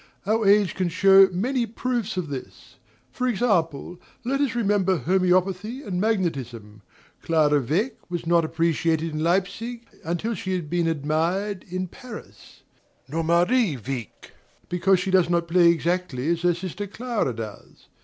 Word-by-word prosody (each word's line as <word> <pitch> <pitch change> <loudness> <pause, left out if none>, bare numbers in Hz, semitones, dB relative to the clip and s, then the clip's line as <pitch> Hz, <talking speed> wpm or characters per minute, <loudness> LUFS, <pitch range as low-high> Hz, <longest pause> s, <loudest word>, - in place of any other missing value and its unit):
Our 215 +1 +1
age 200 -3 +4
can 185 -2 -1
show 195 +2 +6
many 235 +6 -1
proofs 230 -2 -3
of 175 -5 -2
this; 135 -3 -9 0.3
for 255 - -2
example, 180 - 0 0.3
let 275 +3 0
us 275 -5 0
remember 200 -5 +2
homoeopathy 185 - +1
and 185 -3 -3
magnetism. 130 - -2 0.4
Clara 150 -3 +3
Wieck 185 - -1
was 175 -1 -4
not 170 0 +3
appreciated 165 0 0
in 155 0 -2
Leipzig 200 +7 -1 0.2
until 175 +8 -2
she 190 -2 -4
had 165 -5 -5
been 175 -1 +1
admired 165 +6 -1
in 185 +1 -3
Paris; 225 +4 -12 0.5
nor 165 +3 -2
Marie 175 - +2
Wieck, 120 -3 -7 0.4
because 180 +1 +2
she 190 +1 -2
does 185 -2 +4
not 170 -1 +1
play 170 0 +5
exactly 170 -4 0
as 170 -1 -1
her 175 -1 +2
sister 190 +3 -5
Clara 220 - -2
does. 110 -2 -9
180 Hz, 145 wpm, -24 LUFS, 165-205 Hz, 0.5 s, show